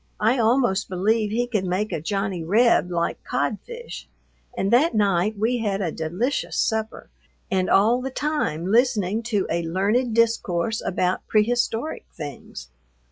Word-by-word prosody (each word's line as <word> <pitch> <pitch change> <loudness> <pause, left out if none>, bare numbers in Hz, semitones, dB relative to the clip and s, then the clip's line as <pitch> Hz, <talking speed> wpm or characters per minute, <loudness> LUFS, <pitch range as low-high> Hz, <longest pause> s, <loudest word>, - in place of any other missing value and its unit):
I 230 +4 +2
almost 225 -4 +2
believe 210 +4 +1
he 235 +3 0
could 220 -6 -1
make 190 +4 -1
a 155 - -3
Johnny 195 0 -2
Reb 200 -2 +3
like 170 -1 -2
codfish, 470 - -4 0.5
and 195 -1 0
that 275 +3 +4
night 205 0 +1
we 235 +4 0
had 205 -3 -1
a 180 -5 -1
delicious 180 - -2
supper 220 -1 -2 0.4
and 190 -1 +1
all 225 +6 +4
the 265 - -3
time 280 - -2
listening 220 -1 +2
to 205 -4 +1
a 170 - 0
learned 205 +8 0
discourse 225 -3 +1
about 180 0 -1
prehistoric 235 +5 0
things. 145 - -9
210 Hz, 140 wpm, -23 LUFS, 185-235 Hz, 0.5 s, that